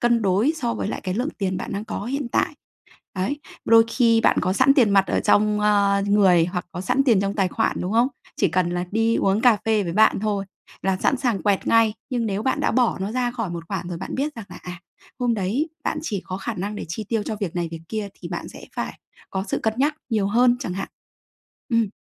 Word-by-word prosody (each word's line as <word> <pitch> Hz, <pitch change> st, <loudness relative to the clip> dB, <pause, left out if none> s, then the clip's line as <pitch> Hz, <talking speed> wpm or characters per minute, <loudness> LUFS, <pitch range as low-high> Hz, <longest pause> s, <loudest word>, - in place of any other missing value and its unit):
cân 235 Hz, -2 st, +3 dB
đối 200 Hz, +10 st, +2 dB
so 235 Hz, -6 st, -1 dB
với 205 Hz, -, -3 dB
lại -, -, -4 dB
cái 185 Hz, -1 st, -3 dB
lượng 255 Hz, +7 st, -1 dB
tiền 190 Hz, -2 st, -1 dB
bạn -, -, -5 dB
đang 200 Hz, +2 st, -3 dB
có 215 Hz, -2 st, -5 dB
hiện 270 Hz, 0 st, -3 dB
tại. -, -, +1 dB, 0.6 s
Đấy, 260 Hz, +11 st, -2 dB, 0.3 s
đôi 225 Hz, 0 st, +7 dB
khi 230 Hz, -1 st, +3 dB
bạn -, -, +3 dB
có 185 Hz, +1 st, +1 dB
sẵn 265 Hz, +5 st, +5 dB
tiền 240 Hz, -7 st, +4 dB
mặt 195 Hz, -1 st, +4 dB
ở -, -, +1 dB
trong, 210 Hz, 0 st, +3 dB
ơ, 200 Hz, -1 st, +3 dB
người 190 Hz, -5 st, +5 dB
hoặc 180 Hz, 0 st, -4 dB
có 175 Hz, -, -5 dB
sẵn 270 Hz, +8 st, +1 dB
tiền 225 Hz, -8 st, +4 dB
trong 200 Hz, 0 st, -1 dB
tài 195 Hz, -3 st, +2 dB
khoản, 225 Hz, +4 st, 0 dB
đúng 185 Hz, -, -3 dB
không? 235 Hz, +3 st, +4 dB, 0.3 s
Chỉ -, -, +2 dB
cần 175 Hz, +1 st, +1 dB
là 175 Hz, 0 st, -2 dB
đi 225 Hz, +1 st, +2 dB
uống 195 Hz, +3 st, +2 dB
cà 240 Hz, -4 st, +5 dB
phê 215 Hz, -2 st, +2 dB
với 170 Hz, -1 st, -3 dB
bạn 220 Hz, -1 st, +4 dB
thôi 205 Hz, -2 st, -1 dB, 0.4 s
là 190 Hz, -1 st, +1 dB
sẵn 265 Hz, -, +1 dB
sàng 240 Hz, -7 st, 0 dB
quẹt 200 Hz, -2 st, +1 dB
ngay, 225 Hz, -2 st, +4 dB, 0.2 s
nhưng 245 Hz, -3 st, -1 dB
nếu 205 Hz, 0 st, -2 dB
bạn 260 Hz, -, 0 dB
đã -, -, +1 dB
bỏ 250 Hz, -2 st, +2 dB
nó 195 Hz, +3 st, -3 dB
ra 245 Hz, 0 st, 0 dB
khỏi 230 Hz, -6 st, -3 dB
một 170 Hz, -1 st, -5 dB
khoản 180 Hz, -3 st, -4 dB
rồi 170 Hz, -, -4 dB
bạn 190 Hz, -, -5 dB
biết 290 Hz, +2 st, -2 dB
rằng 225 Hz, -3 st, -8 dB
là, -, -, -10 dB
à, 180 Hz, -1 st, -8 dB, 0.4 s
hôm 245 Hz, -2 st, +1 dB
đấy 225 Hz, -, -1 dB
bạn 300 Hz, -, -1 dB
chỉ 205 Hz, -, -3 dB
có 185 Hz, -, -4 dB
khả 235 Hz, +3 st, -4 dB
năng 205 Hz, +2 st, -4 dB
để -, -, -5 dB
chi 215 Hz, +7 st, -4 dB
tiêu 225 Hz, -3 st, 0 dB
cho 215 Hz, -, -3 dB
việc 180 Hz, -4 st, -3 dB
này 170 Hz, -1 st, -1 dB
việc 165 Hz, -1 st, -7 dB
kia 215 Hz, -2 st, -3 dB
thì 175 Hz, -, -7 dB
bạn 175 Hz, -1 st, -5 dB
sẽ -, -, -11 dB
phải -, -, -4 dB, 0.3 s
có 190 Hz, 0 st, -2 dB
sự -, -, -1 dB
cân 220 Hz, -1 st, +1 dB
nhắc 295 Hz, +3 st, +2 dB
nhiều 210 Hz, -3 st, +1 dB
hơn 240 Hz, +3 st, +4 dB
chẳng 185 Hz, -9 st, -4 dB
hạn. 195 Hz, +1 st, -4 dB, 0.8 s
Ừm. 230 Hz, -2 st, +2 dB
210 Hz, 255 wpm, -23 LUFS, 190-235 Hz, 0.8 s, đôi